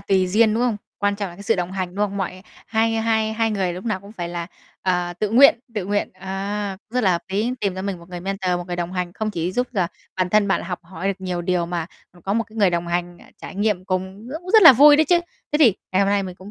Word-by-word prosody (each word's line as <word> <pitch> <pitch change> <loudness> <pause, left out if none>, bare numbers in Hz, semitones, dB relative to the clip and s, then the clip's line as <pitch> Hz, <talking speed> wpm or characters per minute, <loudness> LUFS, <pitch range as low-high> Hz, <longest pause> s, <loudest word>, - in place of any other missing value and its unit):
tùy 190 -2 +2
duyên, 215 +3 +3
đúng 235 - +1
không? 235 -4 +1 0.2
Quan 205 0 +1
trọng 200 -2 -3
là 175 - -13
cái 200 - -10
sự - - +1
đồng 180 +1 -3
hành, 185 -2 -4
đúng 205 +1 +1
không? 200 - -7
Mọi 185 -1 -4 0.2
hai 225 0 +1
hai 220 -1 +1
hai 225 0 0
người 190 -4 -1
lúc 180 +4 -8
nào 215 -5 -1
cũng 200 +2 -13
phải 175 -5 -5
là, 170 -1 -4 0.4
ờ, 180 -1 0
tự 200 +4 -2
nguyện 245 +1 +7 0.2
tự 210 -4 -2
nguyện, 205 +1 -1
à, 195 +1 -4
cũng 225 - -18
rất 250 - +3
là 190 - +4
hợp 170 - -1
lý, 210 +6 0
tìm 195 -2 -1
cho 190 - -5
mình 195 -3 -3
một 170 - -15
người 180 -1 -7
mentor, 195 0 -2
một 175 - -6
người 175 -1 -4
đồng 175 +1 -3
hành, 180 -1 -3
không 215 +1 -3
chỉ 175 -2 -2
giúp 250 +5 0
là 190 -6 +1 0.3
bản 185 -1 +1
thân 210 0 +3
bạn 190 - +2
là - - -8
học 180 -2 -4
hỏi 180 +2 -5
được 195 -1 -3
nhiều 180 -2 -3
điều 180 -1 0
mà, 170 -2 -3 0.3
ừm, 175 - -20
có 195 - -2
một 230 +1 +1
cái 225 +1 -17
người 200 -4 +4
đồng 170 0 -1
hành, 175 0 -2
ờ, - - -17 0.2
trải - - -8
nghiệm 200 -2 0
cùng 190 +4 -4
rất 300 +4 -5
cũng 365 - -7
rất 440 -1 +7
là 325 - +12
vui 290 +4 +8
đấy 315 - +4
chứ. 345 +3 +3 0.3
Thế 295 - +2
thì 245 -11 +6 0.2
ngày 185 - +3
hôm 195 - +1
nay 200 0 +2
mình 185 -2 -6
cũng 190 +2 -12
195 Hz, 300 wpm, -22 LUFS, 180-215 Hz, 0.4 s, là